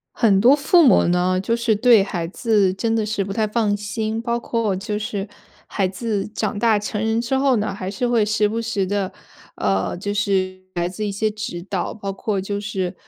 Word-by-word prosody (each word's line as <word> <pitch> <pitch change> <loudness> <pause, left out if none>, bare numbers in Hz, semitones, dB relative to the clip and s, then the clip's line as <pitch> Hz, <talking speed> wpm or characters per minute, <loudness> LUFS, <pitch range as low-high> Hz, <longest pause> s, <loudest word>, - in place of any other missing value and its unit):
很 200 -4 +3
多 250 +6 +7
父 330 +4 +4
母 230 - +5
呢， 180 +1 +2
就 230 +5 0
是 235 -1 +1
对 220 -1 +5
孩 170 -4 -3
子 205 -2 +2
真 225 +3 -1
的 225 -1 +1
是 210 -2 -1
不 195 - -5
太 215 +1 0
放 210 -1 0
心， 220 +2 -3
包 235 0 -1
括 230 -4 -1
就 210 +2 -3
是 205 -2 -4 0.4
孩 195 -2 -1
子 205 +1 -3
长 215 -1 -3
大 220 -1 +3
成 210 0 -4
人 225 +1 +1
之 240 +3 -1
后 270 -2 +3
呢， 210 -2 -1
还 190 -1 -5
是 210 +5 -2
会 235 -3 +2
时 215 0 +1
不 225 +2 -2
时 220 -4 -1
地， 200 -1 -1 0.5
呃， 95 - 0
就 205 +3 -3
是 190 -2 0
来 175 -1 0
自 200 +4 -4
一 205 - -2
些 215 +2 0
指 210 -5 -6
导， 190 -3 -2
包 200 -2 -5
括 200 +1 -2
就 200 +1 -3
是 190 -3 -3
210 Hz, 230 characters per minute, -21 LUFS, 195-225 Hz, 0.5 s, 多